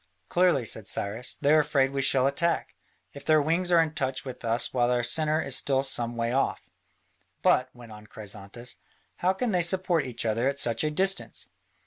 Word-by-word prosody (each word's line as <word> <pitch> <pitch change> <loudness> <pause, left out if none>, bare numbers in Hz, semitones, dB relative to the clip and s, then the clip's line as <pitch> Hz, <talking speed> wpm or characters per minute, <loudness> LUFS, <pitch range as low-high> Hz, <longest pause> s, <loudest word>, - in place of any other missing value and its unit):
"Clearly," 175 -8 +2
said 110 -1 -3
Cyrus, 110 +5 -2
"they 145 +1 +2
are 155 - +6
afraid 140 -3 +1
we 140 0 -2
shall 130 -1 +3
attack, 165 +5 0 0.4
if 140 - -11
their 155 -1 +4
wings 170 +4 +1
are 170 -1 +6
in 160 -1 -5
touch 130 -2 -2
with 130 -1 -8
us 115 +1 0
while 120 -2 +2
their 125 0 +1
centre 155 +5 +2
is 135 - 0
still 135 0 +2
some 120 -3 -2
way 115 0 -1
off." 135 +2 -1 0.8
"But," - - +3
went 120 -2 -13
on 105 0 -12
Chrysantas, 105 +3 -8 0.4
"how 185 +2 +1
can 230 +4 -2
they 180 -2 +2
support 175 -2 +1
each 120 -2 -4
other 115 +3 0
at 140 0 -1
such 115 -2 0
a 155 - +1
distance?" 190 +5 0
135 Hz, 195 wpm, -27 LUFS, 120-160 Hz, 0.8 s, are